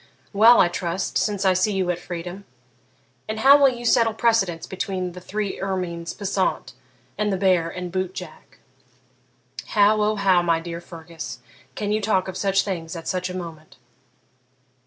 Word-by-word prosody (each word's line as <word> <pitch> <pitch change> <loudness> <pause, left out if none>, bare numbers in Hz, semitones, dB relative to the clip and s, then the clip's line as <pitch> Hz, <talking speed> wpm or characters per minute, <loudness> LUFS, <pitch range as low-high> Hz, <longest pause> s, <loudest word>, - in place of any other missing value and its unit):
Well, 225 +4 +7
I - - +6
trust, 175 +1 -3
since 205 -2 -1
I 190 - +5
see 185 +3 +1
you 185 -2 0
at 175 - -4
freedom. 175 +2 -7 0.8
And 220 0 -3
how 275 +3 +8
will 275 -1 +6
you 240 -1 -6
settle 230 -2 +3
precedence 210 -8 +1
between 185 -1 -3
the 180 +1 -10
three 200 +2 -4
ermines 180 -3 -3
passant 200 - -2 0.5
and 210 -1 +1
the 190 - 0
bear 180 -3 +2
and 180 0 -6
boot 185 0 -3
jack?' - - -10 1.1
'How, 210 0 +3
O 210 +1 +2
how, 190 -3 +3
my 170 -1 +1
dear 170 0 -7
Fergus, 165 -1 -9 0.4
can 205 -1 -2
you 215 +1 +1
talk 195 -3 +1
of 190 - -6
such 195 -1 +1
things 170 -4 -5
at 165 - -8
such 185 0 -2
a 180 - -5
moment!' 160 -5 -9
190 Hz, 170 wpm, -23 LUFS, 175-210 Hz, 1.1 s, how